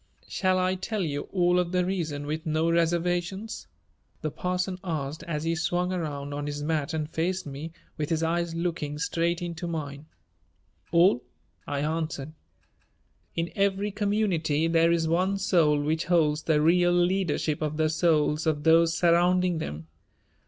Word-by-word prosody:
"Shall 185 -1 +1
I 185 0 +2
tell 195 +2 -3
you 145 -3 -3
all 180 -1 +3
of 175 -1 -1
the 180 -1 +1
reason 160 -6 -2
with 155 +2 -3
no 160 +2 +1
reservations?" 175 +5 -1 0.6
the 155 - -1
parson 180 +2 -2
asked, 155 -4 -3
as 150 -2 -2
he 165 0 0
swung 180 +3 0
around 145 -5 -4
on 145 0 -4
his 145 0 -4
mat 155 0 -1
and 155 -1 -2
faced 175 +4 -2
me, 145 +3 -6 0.3
with 150 - -1
his 165 -1 0
eyes 170 0 0
looking 165 -4 -2
straight 170 +2 -1
into 170 0 -4
mine. 150 -3 -5 0.8
"All," 170 -6 +4 0.4
I 140 -1 -2
answered. 155 -1 -3 1.0
"In 165 +1 -2
every 200 0 +1
community 195 -7 +1
there 165 0 +4
is 165 -1 +1
one 185 +4 +1
soul 165 -6 +3
which 155 +3 -1
holds 155 -4 +2
the 155 -1 +2
real 175 +2 +4
leadership 175 -4 +1
of 155 -1 -2
the 155 0 +2
souls 155 -1 +2
of 150 -2 0
those 165 0 +4
surrounding 175 0 +3
them. 80 - -5
165 Hz, 155 wpm, -27 LUFS, 155-180 Hz, 1.0 s, All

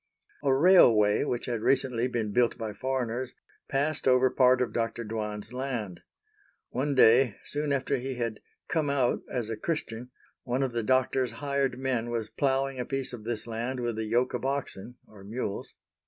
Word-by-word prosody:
A 140 - +3
railway, 130 - +6
which 120 - -2
had 120 -3 -2
recently 125 -1 +1
been 115 -4 -2
built 120 +2 +2
by 110 -3 -4
foreigners, 130 0 -2 0.4
passed 145 +2 0
over 130 0 +5
part 130 -1 +4
of 125 -2 -1
Dr. 115 0 -2
Dwan's 105 0 -4
land. 125 -8 -4 0.7
One 140 +3 -1
day, 120 -2 +6
soon 145 0 -2
after 140 0 0
he 130 +1 -4
had 115 -3 -3 0.3
come 155 -4 0
out 135 -3 +1
as 115 -3 -2
a - - -1
Christian, 125 -4 -4 0.3
one 125 +2 -1
of 130 - -1
the 120 -1 -1
doctor's 130 +1 +1
hired 140 -3 -1
men 125 -3 -1
was 115 -2 -3
ploughing 135 +1 0
a 125 - -2
piece 135 -2 -3
of 110 -3 -8
this 115 -2 -3
land 120 +3 -3
with 120 -2 -2
a 110 - -2
yoke 120 +4 +1
of 125 - -3
oxen 130 -4 -3
(or 105 -3 -15
mules). 105 -1 -5
125 Hz, 175 wpm, -28 LUFS, 115-135 Hz, 0.7 s, railway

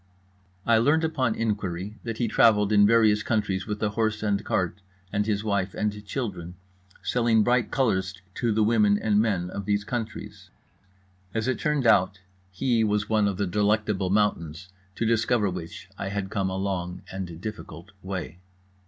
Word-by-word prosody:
I 115 -1 +4
learned 145 +7 +3
upon 135 -8 0
inquiry 105 -2 -3
that 115 -1 -4
he 120 - 0
travelled 105 -2 +4
in 100 -1 +6
various 110 -2 +4
countries 105 -4 -1
with 105 0 -3
a 105 - +2
horse 110 0 -1
and 100 -1 0
cart 90 +2 -1 0.3
and 105 +1 0
his 105 -1 0
wife 100 -3 -1
and 105 -1 -2
children, 90 -9 -4 0.5
selling 115 -3 +2
bright 120 -1 +2
colours 95 -7 0
to 120 +1 0
the 110 0 +2
women 105 -2 +4
and 105 -1 +2
men 95 -5 -1
of 100 - -5
these 100 0 0
countries. 110 0 -6 0.9
As 110 +2 -1
it 130 - 0
turned 150 -4 0
out, 95 -2 +4 0.3
he 115 +4 +1
was 105 0 0
one 110 -2 +3
of 100 -2 -2
the 100 - 0
Delectable 105 0 +1
Mountains; 90 -4 0 0.3
to 115 - -1
discover 110 -2 +2
which 90 0 -7
I 95 - -3
had 100 0 -4
come 95 -2 0
a 95 - -3
long 90 -2 -3
and 90 -4 -6
difficult 95 -3 -8
way. 95 -2 -5
105 Hz, 170 wpm, -26 LUFS, 95-110 Hz, 0.9 s, in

